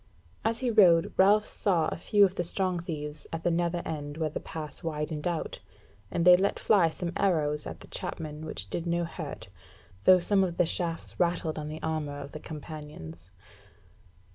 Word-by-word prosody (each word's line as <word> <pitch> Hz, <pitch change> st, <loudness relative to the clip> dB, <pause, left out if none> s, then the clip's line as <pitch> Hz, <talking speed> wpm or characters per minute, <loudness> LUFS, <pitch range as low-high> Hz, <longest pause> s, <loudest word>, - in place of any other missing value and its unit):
As 225 Hz, +2 st, 0 dB
he 250 Hz, -2 st, +1 dB
rode 175 Hz, -7 st, +5 dB
Ralph 205 Hz, +3 st, +5 dB
saw 170 Hz, -6 st, +1 dB
a -, -, -3 dB
few 205 Hz, +4 st, +4 dB
of 185 Hz, -, -1 dB
the 175 Hz, -, -1 dB
Strong 185 Hz, +1 st, +1 dB
thieves 150 Hz, -3 st, -5 dB
at 165 Hz, 0 st, -4 dB
the 175 Hz, -, +2 dB
nether 170 Hz, 0 st, 0 dB
end 145 Hz, -1 st, -5 dB
where 160 Hz, -2 st, -1 dB
the -, -, -3 dB
pass 155 Hz, -2 st, -7 dB
widened 150 Hz, -1 st, -3 dB
out, 170 Hz, -2 st, -3 dB, 0.5 s
and 170 Hz, -, -1 dB
they 180 Hz, 0 st, +10 dB
let 195 Hz, +3 st, +1 dB
fly 195 Hz, -7 st, +4 dB
some 170 Hz, +1 st, -4 dB
arrows 150 Hz, -6 st, +1 dB
at -, -, -8 dB
the -, -, -11 dB
chapmen 155 Hz, -1 st, -5 dB
which 100 Hz, -10 st, -5 dB
did 170 Hz, -, -3 dB
no 170 Hz, 0 st, +1 dB
hurt, 160 Hz, -, -6 dB, 0.6 s
though 185 Hz, -, +9 dB
some 195 Hz, +2 st, +2 dB
of 175 Hz, -2 st, -2 dB
the 175 Hz, -, +4 dB
shafts 165 Hz, 0 st, -2 dB
rattled 170 Hz, -2 st, 0 dB
on 150 Hz, -, -5 dB
the 155 Hz, +1 st, -7 dB
armour 155 Hz, -3 st, -2 dB
of 140 Hz, 0 st, -8 dB
the 155 Hz, -, -7 dB
companions. 150 Hz, -, -8 dB
165 Hz, 190 wpm, -29 LUFS, 150-180 Hz, 0.6 s, they